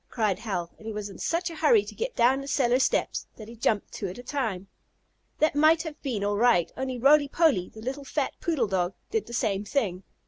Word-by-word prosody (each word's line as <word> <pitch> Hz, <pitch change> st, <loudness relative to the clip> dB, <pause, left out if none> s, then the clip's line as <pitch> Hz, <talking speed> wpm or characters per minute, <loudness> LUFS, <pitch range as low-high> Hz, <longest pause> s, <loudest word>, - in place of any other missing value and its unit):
cried 215 Hz, -6 st, 0 dB
Hal, 180 Hz, -6 st, -3 dB
and 220 Hz, -, -11 dB
he -, -, -3 dB
was 210 Hz, -1 st, -5 dB
in 195 Hz, -, -12 dB
such 340 Hz, +1 st, -1 dB
a -, -, -8 dB
hurry 430 Hz, +5 st, +4 dB
to -, -, -8 dB
get 485 Hz, +1 st, -4 dB
down 255 Hz, +3 st, +3 dB
the 275 Hz, -, -8 dB
cellar 255 Hz, -3 st, +2 dB
steps -, -, 0 dB
that 215 Hz, -, -10 dB
he 230 Hz, -, -10 dB
jumped 220 Hz, -2 st, 0 dB
two 200 Hz, -, -4 dB
at 180 Hz, -, -7 dB
a 245 Hz, -, -9 dB
time. 225 Hz, -9 st, -3 dB, 0.7 s
That 310 Hz, -, +2 dB
might 310 Hz, +2 st, +4 dB
have 315 Hz, -2 st, -8 dB
been 235 Hz, -8 st, -2 dB
all 205 Hz, 0 st, 0 dB
right, 225 Hz, -7 st, +3 dB
only 260 Hz, -1 st, -3 dB
Roly 285 Hz, +4 st, +5 dB
Poly, 280 Hz, -, +2 dB
the 220 Hz, -, -12 dB
little 265 Hz, +5 st, -4 dB
fat 275 Hz, 0 st, -2 dB
poodle 315 Hz, -9 st, +1 dB
dog, 185 Hz, -2 st, -1 dB, 0.2 s
did 445 Hz, -1 st, -1 dB
the 235 Hz, -, -9 dB
same 205 Hz, -3 st, 0 dB
thing. 205 Hz, -7 st, -1 dB
240 Hz, 235 wpm, -27 LUFS, 205-290 Hz, 0.7 s, Roly